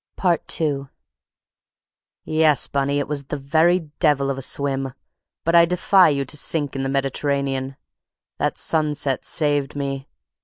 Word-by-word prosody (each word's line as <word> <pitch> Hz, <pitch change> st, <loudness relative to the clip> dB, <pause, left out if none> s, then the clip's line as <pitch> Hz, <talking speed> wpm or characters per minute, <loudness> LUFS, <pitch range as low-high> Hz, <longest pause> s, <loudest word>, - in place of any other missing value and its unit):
II 145 Hz, -4 st, -1 dB, 1.4 s
"Yes, 155 Hz, -2 st, +3 dB
Bunny, 140 Hz, 0 st, -1 dB
it 145 Hz, -, -1 dB
was 145 Hz, -1 st, -3 dB
the -, -, -4 dB
very 160 Hz, +4 st, +1 dB
devil 140 Hz, -4 st, +2 dB
of 135 Hz, -, -4 dB
a -, -, -6 dB
swim; 135 Hz, -1 st, -1 dB, 0.5 s
but 165 Hz, -, 0 dB
I 170 Hz, 0 st, +7 dB
defy 180 Hz, +1 st, +4 dB
you 140 Hz, -2 st, -1 dB
to 135 Hz, -, -2 dB
sink 145 Hz, -1 st, 0 dB
in 135 Hz, -, -2 dB
the 135 Hz, -, -2 dB
Mediterranean. 135 Hz, 0 st, -1 dB, 0.6 s
That -, -, -1 dB
sunset 150 Hz, -4 st, 0 dB
saved 145 Hz, -3 st, 0 dB
me. 135 Hz, -1 st, -4 dB
140 Hz, 140 wpm, -22 LUFS, 135-155 Hz, 1.4 s, I